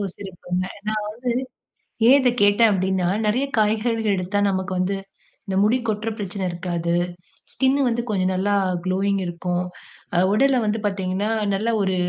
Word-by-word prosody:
சிறப்புங்க. 185 -2 -4 0.2
நான் 215 0 0
வந்து, 210 - -4 1.0
ஏன் 270 +3 +8
இத 250 - +4
கேட்டேன் 205 +3 +5
அப்டினா? 190 -2 +1 0.2
நிறைய 230 +6 +2
காய்கறிகள் 220 0 +1
எடுத்தா 185 +2 -1
நமக்கு 190 -1 -1
வந்து, 190 +2 0 0.5
இந்த 195 -3 -3
முடி 220 +5 +3
கொட்ற 215 +1 -1
பிரச்சன 200 -1 -3
இருக்காது. 170 -1 -2 0.6
ஸ்கின் 265 +1 +2
வந்து 235 0 0
கொஞ்சம் 190 -3 +1
நல்லா 195 +2 0 0.3
குளோயிங் 195 +2 +1
இருக்கும். 175 +1 -2 0.5
அ - - +3 0.2
உடல்ல 265 +4 +3
வந்து 215 +1 0
பார்த்தீங்கன்னா, 195 +1 -1 0.3
நல்ல 225 +4 0
ஒரு 190 -1 +1
200 Hz, 145 wpm, -22 LUFS, 185-215 Hz, 1.0 s, ஏன்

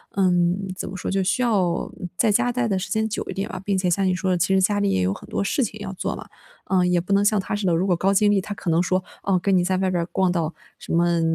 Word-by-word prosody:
嗯， 180 0 +2
怎 - - -5
么 190 - -7
说， - - -4
就 195 0 +1
需 190 +5 0
要 190 -8 +1 0.3
在 225 - +3
家 245 +4 +2
待 245 -1 0
的 195 -3 0
时 185 - -4
间 220 0 +1
久 210 - -3
一 - - -3
点 195 - -3
吧。 190 - -6
并 195 -1 0
且 185 -1 +1
像 195 +3 +1
你 185 - +2
说 185 +1 -1
的 180 - +2
其 190 - +1
实 190 - +4
家 205 +2 +2
里 200 - +1
也 95 - +1
有 90 +1 +1
很 - - -11
多 - - -1
事 255 +7 0
情 215 -1 -5
要 205 -2 -5
做 185 - -3
嘛， - - -9 0.4
嗯， 180 -2 +2
也 180 -1 +3
不 185 +3 -2
能 200 +1 +4
像 210 0 +3
他 195 - -3
似 205 -1 -3
的， 175 - +2
如 175 +3 +1
果 180 - +3
高 195 +3 +1
精 205 +1 +4
力 205 - +3
他 205 - -6
可 200 - -5
能 165 +1 +3
说， 185 +1 0 0.2
哦， 190 -2 +2
跟 195 0 +2
你 180 - +2
在 185 +1 0
外 190 0 +1
边 180 -2 0
儿 - - -2
逛 190 -2 +2
到 170 -2 -1 0.3
什 - - -6
么 170 0 +2
190 Hz, 340 characters per minute, -23 LUFS, 180-200 Hz, 0.4 s, 实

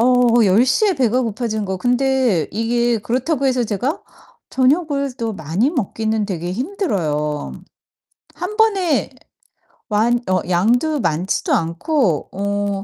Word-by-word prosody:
어 240 -1 +4
10:00 240 - +3
에 380 - +1
배가 255 -2 +1
고파지는 220 -2 -2
거 190 0 -3
근데 250 - +1
이게 235 +2 +1
그렇다고 260 +6 -1
해서 250 -2 +1
제가 245 - -2 0.5
저녁을 280 0 +1
또 230 -2 -3
많이 190 - -1
먹기는 220 - -1
되게 175 -2 -4
힘들어요. 180 - -2 0.8
1 425 - -5
번에 395 -8 +2 0.8
완 230 +3 +2
어 185 -2 +2
양도 245 - +2
많지도 175 -3 -1
않고 170 - 0
어 200 0 -2
235 Hz, 225 characters per minute, -19 LUFS, 195-265 Hz, 0.8 s, 어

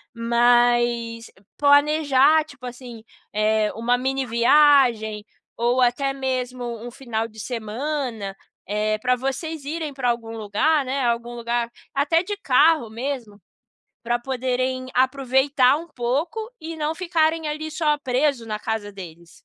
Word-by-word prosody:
mas 235 0 +2 0.3
planejar, 290 +1 +4
tipo 280 -5 -13
assim, 245 -2 -9 0.3
eh, 215 0 +2
uma 240 +2 +1
mini 265 +1 -1
viagem 235 -4 +4 0.3
ou 240 +2 +1
até 270 +3 +1
mesmo 250 -3 -4
um - - -5
final 230 -3 -3
de 220 -1 -15
semana, 230 -1 -4 0.3
eh, 215 +1 0
pra 250 +2 +2
vocês 275 +3 -4
irem 310 -1 -4
pra 255 -3 -1
algum 230 -1 -3
lugar, 265 +8 +1
né, 265 +1 -1
algum 235 0 -1
lugar 235 0 -2 0.2
até 300 +5 +2
de 410 +2 -4
carro 295 - +3
mesmo, 230 -4 -5 0.6
pra 240 0 0
poderem 255 0 -2
aproveitar 265 +1 +3
um 335 +2 -7
pouco 280 - -2 0.2
e 325 +1 -6
não 310 +1 -2
ficarem, 325 -3 0
ali, 310 +1 -4
só 300 -2 +1
preso 260 -2 0
na 215 -1 -3
casa 220 -2 -3
deles. 170 -3 -11
250 Hz, 135 wpm, -23 LUFS, 230-285 Hz, 0.6 s, planejar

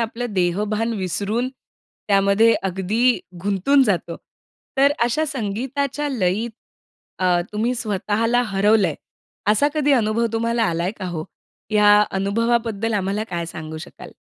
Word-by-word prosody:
आपलं 230 0 -3
देहभान 210 +5 0
विसरून, 205 +6 -1 0.6
त्यामध्ये 200 +3 +4
अगदी 195 +7 +1 0.2
गुंतून 205 +8 +3
जातो. 180 -7 -1 0.6
तर 280 +1 +5
अशा 245 +7 +1
संगीताच्या 270 +3 -2
लयीत, 220 -2 0 0.7
अ, 180 -1 +2
तुम्ही 230 +4 0
स्वतःला 225 +2 0
हरवल 205 +2 +3
आहे. 160 -5 0 0.6
असा 215 +8 +3
कधी 290 -2 +2
अनुभव 230 -2 +2
तुम्हाला 230 0 +1
आला 170 -4 0
आहे 180 +3 -1
का 195 - -5
हो? 160 -3 -4 0.5
या 210 -1 +6 0.2
अनुभवाबद्दल 225 +2 0
आम्हाला 200 +2 -1
काय 170 -1 -3
सांगू 155 -1 -7
शकाल? - - -11
215 Hz, 125 wpm, -21 LUFS, 195-235 Hz, 0.7 s, या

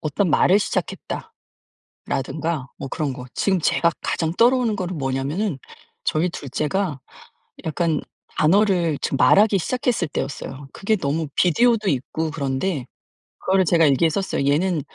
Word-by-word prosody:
'어떤 160 +4 0
말을 190 +6 +5
시작했다.'라든가 - - -4 1.3
뭐 135 - -6
그런 145 0 -2
거 125 -1 -8
지금 190 -3 +1
제가 170 +1 +2
가장 160 -1 -1
떠오르는 235 -1 +3
거는 185 -3 -3
뭐냐면은 135 +6 -2 0.5
저희 165 +4 +1
2 145 -5 -8
째가 155 +1 -1 0.7
약간 160 -1 0 0.4
단어를 175 -2 +3
지금 135 - -1
말하기 205 +5 +5
시작했을 240 -2 -1
때였어요. 135 0 -5
그게 215 +2 0
너무 155 -2 -1
비디오도 220 +3 +3
있고 155 +3 -2
그런데 140 0 -2 0.6
그거를 190 0 +2
제가 165 -1 +4
일기에 145 +4 +3
썼어요. 160 -5 -1
얘는 170 +3 +1
165 Hz, 315 characters per minute, -22 LUFS, 145-195 Hz, 1.3 s, 말을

